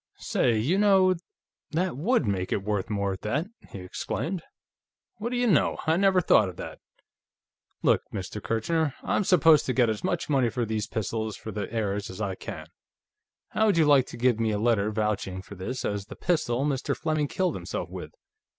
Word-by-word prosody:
"Say, 115 -3 +1
you 150 - +1
know, 190 -3 +5 0.6
that 180 +1 0
would 185 - +1
make 95 -3 -1
it 100 - 0
worth 105 +1 -1
more, 100 -2 -1
at 95 - -8
that!" 145 +10 -1 0.2
he 95 - -8
exclaimed. 160 - -3 0.8
"What 225 +3 -3
do 245 - -2
you 245 - +2
know! 195 -10 +3
I 160 0 +3
never 190 0 +4
thought 110 - +4
of 90 - -9
that.... - - -8 1.0
Look, - - +4
Mr. 100 +1 -5
Kirchner; 145 +7 0
I'm - - +1
supposed 165 -6 +5
to 130 - +1
get 120 -3 +3
as 110 - -5
much 175 -2 -1
money 135 -5 +2
for 120 +1 -2
these 110 -1 -2
pistols, 110 -1 -3
for 110 - -7
the 105 -1 -4
heirs, 105 -3 -2
as 95 - -8
I 100 -3 -1
can. - - -7 0.8
How 220 - +2
would 200 -5 +3
you 160 - +5
like 140 -3 +5
to - - -9
give 120 -1 +2
me 115 -1 +1
a 105 - 0
letter, 110 -2 +2
vouching 105 -3 -2
for 100 - -11
this 105 +7 -4
as 100 -1 -2
the - - -9
pistol 140 -7 0
Mr. 140 -3 -1
Fleming 155 -2 0
killed 185 +5 0
himself - - -4
with? - - -7
120 Hz, 195 wpm, -27 LUFS, 105-165 Hz, 1.0 s, know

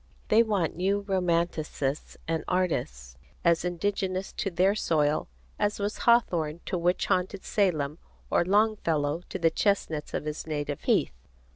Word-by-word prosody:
They 220 - +6
want 205 -7 0
new 195 +4 +1
romanticists 170 -7 -1
and 160 -1 -1
artists 65 - -1 0.3
as 170 -1 +4
indigenous 185 +1 -2
to 195 - -2
their 185 +2 +3
soil 155 -7 +1 0.3
as 205 0 +1
was 205 +1 -2
Hawthorne 170 -10 +3
to - - -2
witch 175 +1 +1
haunted 185 +1 0
Salem 160 -7 0 0.3
or - - +4
Longfellow 175 -6 +1
to - - -3
the 165 -2 +3
chestnuts 165 -6 0
of - - -3
his 150 +1 -5
native 145 -2 -3
heath. - - +2
175 Hz, 140 wpm, -28 LUFS, 155-195 Hz, 0.3 s, They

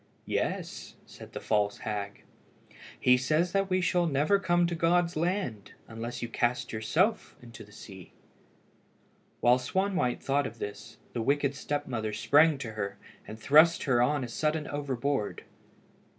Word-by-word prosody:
"Yes," - - -3
said - - -13
the - - -5
false 105 -1 0
hag; 105 -2 -5 0.8
"he 125 0 +5
says 155 +8 0
we 185 0 +1
shall 175 -1 +1
never 155 +7 +2
come 175 -2 +2
to 170 - -2
God's 170 +1 +1
land 160 - -2
unless 120 +2 -6
you - - -2
cast 120 +1 -1
yourself 175 - 0
into 115 -2 -12
the 105 - -18
sea." 95 -3 -12 1.3
While 125 +1 +5
Swanwhite 180 -1 0
thought 140 0 +1
of 115 - -10
this, 105 -1 -7 0.2
the 120 - -2
wicked 140 +3 +1
step 145 +1 -3
mother 110 -4 -3
sprang 150 +7 +4
to 125 -5 -6
her, 100 -2 -4 0.3
and 110 - -8
thrust 155 +7 +5
her 125 -4 +2
on 145 +2 +1
a - - -4
sudden 150 +5 -1
overboard. 140 -4 -2
135 Hz, 150 wpm, -29 LUFS, 115-160 Hz, 1.3 s, he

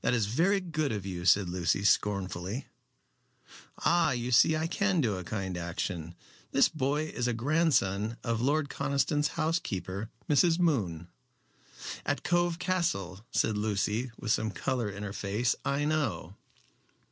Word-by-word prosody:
"That - - +2
is 115 -4 +1
very 170 - +2
good 155 -5 -2
of 105 -3 -3
you," 90 -2 -5
said 95 +1 +5
Lucy, 90 +2 0
scornfully. 100 +2 0 1.2
"Ah, 170 -2 +4
you 120 +1 -3
see 155 +6 +6
I 160 - -1
can 190 +2 +1
do 115 -9 +1
a 95 - -5
kind 95 -1 -4
action. 85 -1 -4 0.4
This 135 - +5
boy 150 0 0
is 125 -5 -2
a 125 - +1
grandson 115 - +1
of 115 -2 -1
Lord 145 +3 +1
Conniston's 140 +2 0
housekeeper, 100 - -2 0.2
Mrs. 165 +3 +4
Moon." 100 - 0 1.0
"At 145 - -1
Cove 175 -1 +1
Castle," 170 - -1
said 110 - +1
Lucy, 105 +3 0
with 110 - -2
some 110 0 +1
color 115 +1 -2
in 100 +1 -7
her 100 -1 -5
face. 105 +5 0
"I 140 +1 0
know." 130 - -1
115 Hz, 145 wpm, -30 LUFS, 100-155 Hz, 1.2 s, see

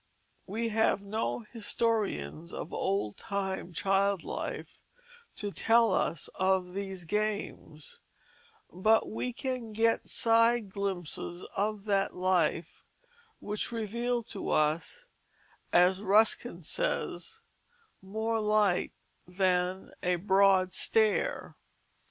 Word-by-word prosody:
We 225 +4 -2
have 220 -2 +2
no 215 +4 -2
historians 210 - -2
of - - -6
old 190 - -1
time 190 -2 -3
child 195 +1 +1
life - - -6 0.5
to 205 -1 -4
tell 230 +2 +3
us 165 - 0
of 185 -1 0
these 195 -2 -5
games, 205 -6 -3 0.7
but 215 +6 +3
we 250 +3 -3
can 250 -3 -4
get 225 +1 +2
side 230 -2 +3
glimpses 180 -3 -3
of 205 0 -1
that 200 -2 +1
life 180 -3 0 0.6
which 210 +3 -3
reveal 235 +2 -2
to 205 - -6
us, 160 - 0 0.7
as 180 +2 +4
Ruskin 210 -2 +2
says, 460 - -3 0.6
more 220 +4 -2
light 210 -4 +2 0.3
than 180 0 0
a 180 0 +1
broad 190 0 +3
stare. 220 - +1
200 Hz, 100 wpm, -30 LUFS, 185-225 Hz, 0.7 s, as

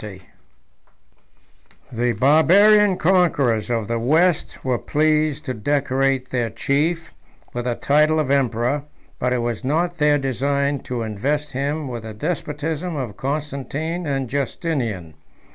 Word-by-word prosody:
] - - -12 1.9
The 120 0 0
Barbarian 185 - +5
conquerors 145 - +2
of 115 -3 -1
the 115 0 -1
West 155 +8 +1
were 125 -3 0
pleased 155 0 +1
to 130 - -2
decorate 135 +1 0
their 120 -3 0
chief 155 +9 -1 0.4
with 120 0 -4
the 120 -1 0
title 150 +4 +3
of 145 -3 0
emperor; 135 +1 +1 0.3
but 125 - 0
it 125 -2 0
was 120 -2 -3
not 170 +5 0
their 150 -1 +4
design 140 +1 0
to 120 -2 -2
invest 140 +8 -2
him 145 +3 -2
with 120 -2 -5
the 110 -1 -8
despotism 155 +3 -3
of 125 -8 -4
Constantine 150 +5 -3
and 135 -2 -1
Justinian. 125 - -3
140 Hz, 130 wpm, -21 LUFS, 125-155 Hz, 1.9 s, Barbarian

